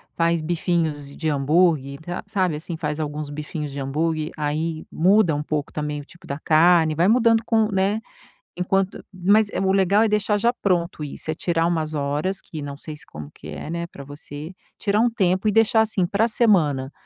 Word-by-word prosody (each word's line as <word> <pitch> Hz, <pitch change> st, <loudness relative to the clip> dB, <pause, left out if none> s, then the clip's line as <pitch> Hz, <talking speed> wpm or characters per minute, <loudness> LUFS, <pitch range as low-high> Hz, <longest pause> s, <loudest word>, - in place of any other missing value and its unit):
faz 170 Hz, -1 st, +2 dB
bifinhos 160 Hz, -4 st, -1 dB
de 160 Hz, -, -2 dB
hambúrguer 145 Hz, -1 st, +2 dB
ta 175 Hz, +4 st, -5 dB
sabe, 185 Hz, -6 st, 0 dB
assim, 160 Hz, +2 st, -6 dB
faz 150 Hz, -1 st, -3 dB
alguns 150 Hz, -1 st, -4 dB
bifinhos 150 Hz, 0 st, -5 dB
de 140 Hz, -, -6 dB
hambúrguer 155 Hz, +3 st, -1 dB
aí 155 Hz, +2 st, -2 dB
muda 185 Hz, +1 st, +4 dB
um 145 Hz, -, -2 dB
pouco 150 Hz, -2 st, -3 dB
também 150 Hz, -1 st, -3 dB
o 140 Hz, -, -14 dB
tipo 175 Hz, -, -17 dB
da 140 Hz, -, -3 dB
carne, 160 Hz, 0 st, +4 dB
vai 175 Hz, +4 st, +3 dB
mudando 230 Hz, -1 st, +4 dB
com 220 Hz, -2 st, +3 dB
né, 195 Hz, +3 st, +1 dB, 0.6 s
enquanto 195 Hz, +1 st, -1 dB
mas 200 Hz, +4 st, +3 dB, 0.2 s
o 190 Hz, -, +3 dB
legal 195 Hz, +3 st, +4 dB
é -, -, +3 dB
deixar 210 Hz, 0 st, +1 dB
já 235 Hz, +3 st, +2 dB
pronto 175 Hz, -8 st, -1 dB
isso, 150 Hz, +2 st, -5 dB
é -, -, -1 dB
tirar 165 Hz, 0 st, 0 dB
umas 160 Hz, -2 st, -1 dB
horas 150 Hz, +6 st, -1 dB
que 155 Hz, -2 st, -8 dB
não 140 Hz, 0 st, -6 dB
sei 155 Hz, 0 st, -8 dB
se -, -, -15 dB
como 75 Hz, -1 st, -9 dB
que -, -, -12 dB
é, -, -, -7 dB
né, 170 Hz, 0 st, -3 dB
para 140 Hz, -, -11 dB
você 145 Hz, +3 st, -9 dB, 0.2 s
tirar 205 Hz, 0 st, +1 dB
um 240 Hz, -, +4 dB
tempo 190 Hz, -2 st, +1 dB
e -, -, +4 dB
deixar, 225 Hz, +1 st, +4 dB
assim, 210 Hz, -5 st, +1 dB
para 205 Hz, +5 st, +1 dB
semana, 160 Hz, -, +2 dB
165 Hz, 195 wpm, -23 LUFS, 150-195 Hz, 0.6 s, muda